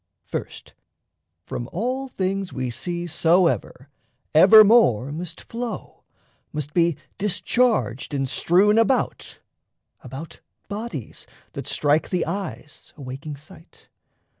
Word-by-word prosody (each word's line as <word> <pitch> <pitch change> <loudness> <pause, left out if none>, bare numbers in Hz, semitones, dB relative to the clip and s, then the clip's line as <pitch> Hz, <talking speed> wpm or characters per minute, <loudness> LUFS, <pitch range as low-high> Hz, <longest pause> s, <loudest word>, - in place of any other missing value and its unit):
First, - - -7 0.7
from 120 - -5
all 255 +8 -2
things 195 -4 -2
We 130 -1 -3
see 175 +8 -3
soever, 170 -4 +1 0.5
evermore 195 - +7
must 165 +1 -6
flow, 235 0 -6 0.5
Must 150 -1 -5
be 170 -3 +2 0.2
discharged 210 - 0
and 135 -2 -1
strewn 200 - +3
about, 230 - 0 0.6
about, 140 +6 -9 0.3
Bodies 205 - -6 0.3
that - - -6
strike 150 +1 +1
the 180 - 0
eyes, 195 -6 -6
awaking 140 +2 -7
sight. 160 +4 -17
170 Hz, 100 wpm, -23 LUFS, 145-205 Hz, 0.7 s, evermore